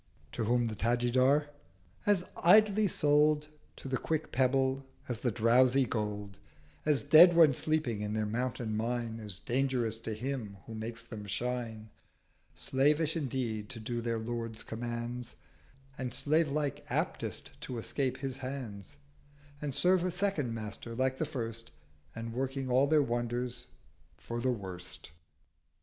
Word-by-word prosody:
To 115 - -2
whom 120 +2 +2
the 110 - -2
Tajidar—'As 130 - 0
idly 210 +3 +5
sold 150 -2 +3 0.3
To - - -9
the 130 0 -1
quick 160 -1 -2
Pebble 130 +1 +2 0.2
as 120 -3 -3
the 120 - +1
drowsy 125 +4 +4
Gold, 105 -3 -3 0.5
As 150 -3 +3
dead 165 +4 +8
when 160 -4 +7
sleeping 130 -7 0
in 105 0 -2
their 110 0 0
mountain 115 0 -2
mine 115 0 -2
As 105 -4 -4
dangerous 120 -1 0
to 115 -1 -4
Him 115 -4 -4
who 115 - -8
makes 115 +1 -5
them 110 -3 -8
shine: 115 0 -3 0.6
Slavish 150 +4 +2
indeed 125 -8 -2
to 125 -4 -5
do 120 +2 -3
their 115 -1 -1
Lord's 115 0 -4
Commands, 120 +1 -5 0.6
And 125 -2 -3
slave 155 +1 +2
like 145 -1 -2
aptest - - -2
to 125 - -5
escape 130 +3 -2
his 135 -1 -4
Hands, 125 - -6 0.6
And 145 -3 -3
serve 180 0 +3
a 185 - +1
second 180 -8 0
Master 110 +1 -6
like 130 +1 0
the 160 - 0
first, 115 -5 -5 0.5
And 115 0 -5
working 135 +1 -2
all 130 +3 +4
their 150 0 +4
wonders 120 0 -2 0.5
for 120 0 -5
the 130 - +1
worst.' 95 - -5
125 Hz, 140 wpm, -31 LUFS, 115-140 Hz, 0.6 s, dead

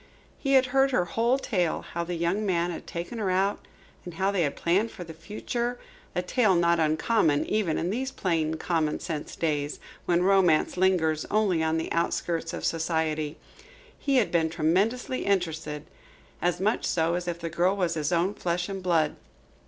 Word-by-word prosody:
He 275 -1 0
had 265 -1 +6
heard 270 0 +4
her 250 -9 +1
whole 230 +8 +1
tale, 185 -11 -1
how 170 - -1
the 175 +1 -4
young 170 +5 0
man 175 -3 +1
had 170 - -8
taken 175 +7 -5
her 200 -3 0
out 190 +2 +1 0.4
and 175 -2 -8
how 190 +3 +1
they 195 -3 0
had 145 -4 0
planned 190 +7 +1
for 180 - -8
the 165 -1 -9
future 235 +8 -3 0.4
a 180 - 0
tale 205 0 +3
not 170 0 +3
uncommon 155 0 +2
even 205 -7 0
in 175 - -1
these 260 +5 -2
plain, 160 -7 0
common 160 -2 0
sense 155 -4 -5
days, 145 -3 -1 0.3
when 175 0 +3
Romance 185 -5 +3
lingers 175 -4 +2
only 200 -6 +2
on 160 0 +1
the 160 - -3
outskirts 165 0 -1
of - - -4
society. 160 -2 -1 0.6
He 280 -1 0
had 245 -5 +3
been 165 -2 +2
tremendously 195 +11 0
interested, 160 -6 -1 0.6
as 175 0 +1
much 210 +4 +1
so 165 -1 +1
as 175 0 -2
if 175 -1 -2
the 165 -1 -5
girl 180 +4 +2
was 175 -3 +1
his 155 0 -1
own 175 +3 +2
flesh 175 -1 -2
and 195 -1 -4
blood. 165 -4 +2
175 Hz, 185 wpm, -27 LUFS, 160-200 Hz, 0.6 s, had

